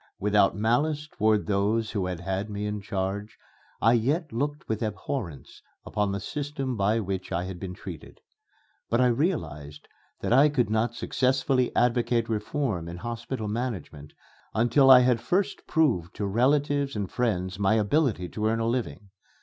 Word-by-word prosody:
Without 105 Hz, -1 st, +3 dB
malice 145 Hz, +8 st, +1 dB
toward 110 Hz, -6 st, +1 dB
those 105 Hz, +2 st, 0 dB
who 100 Hz, -4 st, -1 dB
had 90 Hz, -2 st, -4 dB
had 95 Hz, +3 st, -3 dB
me 105 Hz, 0 st, -4 dB
in 105 Hz, 0 st, -3 dB
charge, 100 Hz, +2 st, -3 dB, 0.4 s
I 115 Hz, +2 st, +4 dB
yet 140 Hz, +6 st, 0 dB
looked 145 Hz, +5 st, -3 dB
with 110 Hz, 0 st, -2 dB
abhorrence 105 Hz, -, -5 dB, 0.2 s
upon 105 Hz, -2 st, -1 dB
the 100 Hz, -, -2 dB
system 140 Hz, +2 st, -4 dB
by 105 Hz, +2 st, +2 dB
which 95 Hz, -3 st, -4 dB
I 85 Hz, -, -1 dB
had 90 Hz, -1 st, -6 dB
been 90 Hz, -1 st, -6 dB
treated. 85 Hz, -6 st, -10 dB, 0.7 s
But 115 Hz, -, +2 dB
I 125 Hz, -, +5 dB
realized 80 Hz, -, -1 dB, 0.3 s
that -, -, 0 dB
I 140 Hz, +4 st, +6 dB
could 125 Hz, -7 st, 0 dB
not 110 Hz, +2 st, +1 dB
successfully 130 Hz, +1 st, +1 dB
advocate 120 Hz, -1 st, +2 dB
reforms 105 Hz, -, -2 dB
in 85 Hz, -, -7 dB
hospital 115 Hz, +3 st, -5 dB
management 105 Hz, -, -5 dB, 0.4 s
until 120 Hz, +5 st, +4 dB
I 130 Hz, -1 st, +10 dB
had 125 Hz, -2 st, +2 dB
first 180 Hz, +11 st, -1 dB
proved 115 Hz, -, +1 dB
to 105 Hz, -, -2 dB
relatives 140 Hz, +5 st, +1 dB
and 100 Hz, -2 st, -2 dB
friends 95 Hz, -6 st, -1 dB
my 100 Hz, +2 st, +3 dB
ability 110 Hz, -, +1 dB
to 110 Hz, 0 st, -2 dB
earn 115 Hz, +1 st, +1 dB
a 115 Hz, -, 0 dB
living. 115 Hz, -4 st, -3 dB
110 Hz, 160 wpm, -27 LUFS, 100-130 Hz, 0.7 s, I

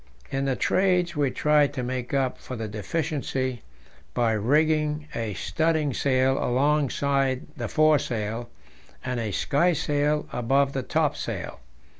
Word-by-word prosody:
In 135 Hz, 0 st, -1 dB
the 135 Hz, -1 st, +1 dB
Trades 180 Hz, 0 st, +2 dB
we 145 Hz, -2 st, +2 dB
tried 150 Hz, +1 st, +2 dB
to 125 Hz, -, -2 dB
make 125 Hz, 0 st, -3 dB
up 135 Hz, -2 st, 0 dB
for 130 Hz, -, -7 dB
the 110 Hz, -2 st, -4 dB
deficiency 130 Hz, -, -2 dB, 0.5 s
by 120 Hz, -2 st, +2 dB
rigging 150 Hz, +6 st, +1 dB
a 110 Hz, -4 st, -3 dB
studding 155 Hz, -, 0 dB
sail 130 Hz, +1 st, +2 dB
alongside 140 Hz, 0 st, +1 dB
the -, -, -4 dB
foresail 120 Hz, -7 st, +1 dB, 0.6 s
and 125 Hz, -1 st, -2 dB
a 110 Hz, -2 st, -2 dB
sky 150 Hz, -, +2 dB
sail 150 Hz, 0 st, 0 dB
above 135 Hz, +3 st, +2 dB
the 135 Hz, -, -1 dB
topsail. -, -, -2 dB
135 Hz, 130 wpm, -26 LUFS, 125-150 Hz, 0.6 s, Trades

